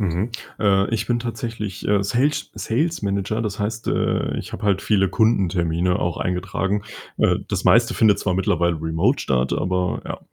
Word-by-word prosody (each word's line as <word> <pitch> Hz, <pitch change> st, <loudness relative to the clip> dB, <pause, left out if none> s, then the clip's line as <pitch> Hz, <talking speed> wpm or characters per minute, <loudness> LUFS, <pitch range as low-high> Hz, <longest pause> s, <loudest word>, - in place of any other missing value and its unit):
Mhm. 100 Hz, +4 st, -1 dB, 0.3 s
Äh, 100 Hz, -2 st, +3 dB
ich 110 Hz, +1 st, -2 dB
bin 120 Hz, 0 st, +2 dB
tatsächlich, 115 Hz, -4 st, -5 dB
äh, 100 Hz, -1 st, +3 dB
Sales- 125 Hz, +9 st, 0 dB
Sales 155 Hz, +5 st, -1 dB
Manager, 100 Hz, +3 st, -1 dB
das 105 Hz, -1 st, -3 dB
heißt, 110 Hz, +2 st, -3 dB
äh, -, -, 0 dB
ich -, -, -8 dB
habe 105 Hz, -, -7 dB
halt 100 Hz, -2 st, +2 dB
viele 100 Hz, -2 st, +2 dB
Kundentermine 90 Hz, -6 st, +1 dB
auch 85 Hz, -, -2 dB
eingetragen. 95 Hz, +3 st, -1 dB, 0.4 s
Äh, -, -, +3 dB
das -, -, -2 dB
meiste 115 Hz, +1 st, +4 dB
findet 110 Hz, -3 st, +4 dB
zwar 95 Hz, -2 st, 0 dB
mittlerweile 85 Hz, -2 st, +1 dB
remote 80 Hz, 0 st, +1 dB
statt, 65 Hz, -1 st, 0 dB
aber 90 Hz, 0 st, 0 dB
ja. -, -, -5 dB
100 Hz, 170 wpm, -22 LUFS, 90-110 Hz, 0.4 s, meiste